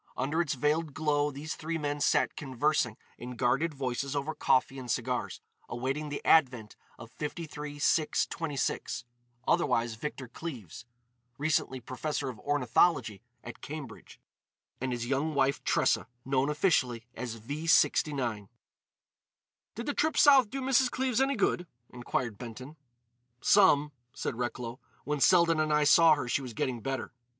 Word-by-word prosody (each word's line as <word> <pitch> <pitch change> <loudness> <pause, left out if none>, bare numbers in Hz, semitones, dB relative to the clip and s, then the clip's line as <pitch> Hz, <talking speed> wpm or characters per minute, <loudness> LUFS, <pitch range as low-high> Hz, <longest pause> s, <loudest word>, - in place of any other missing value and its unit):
Under 145 +6 0
its 155 -4 -1
veiled 150 +2 0
glow 150 -2 +1
these 145 +2 -6
three 165 +1 -3
men 145 -1 -2
sat - - +2
conversing 135 -4 0 0.2
in 125 +1 -7
guarded 135 +7 +1
voices 135 +1 -3
over 145 +2 -2
coffee 135 +1 +1
and 125 -2 -8
cigars, 125 +1 -2 0.3
awaiting 135 +5 -3
the 145 - -6
advent 125 -9 +3 0.2
of 115 0 -12
53 150 -1 -6
6 150 +1 +2
26, 145 -4 -3 0.4
otherwise 115 0 +2
Victor 130 +2 -6
Cleves, 120 - -8 0.5
recently 145 -3 0
Professor 135 +3 -3
of 120 -4 -8
Ornithology 130 - +1 0.2
at - - -10
Cambridge; 150 -2 -9 0.6
and 130 0 -1
his 120 -1 -3
young 140 +4 -1
wife, 140 0 +1
Tressa, - - +1 0.2
known 135 +1 +1
officially 130 - +1
as 125 -3 -5
V 145 +9 -6
69. 125 -11 +2 1.3
"Did 235 - -5
the 290 - -1
trip 315 +2 0
South 270 -6 +6
do 270 +3 -4
Mrs. 260 -1 +3
Cleves 255 -1 0
any 275 +1 +2
good?" 180 -4 0 0.2
inquired 120 -3 -3
Benton. 125 +5 -9 0.6
"Some," 150 -7 +4 0.2
said - - -3
Recklow. 120 +1 -4 0.2
"When 150 0 -2
Selden 170 0 +5
and 155 0 +1
I 150 0 +3
saw 160 +2 +6
her 135 -4 -4
she 130 - 0
was 125 -3 -7
getting 120 -1 -2
better." 135 0 -4
140 Hz, 145 wpm, -30 LUFS, 125-155 Hz, 1.3 s, South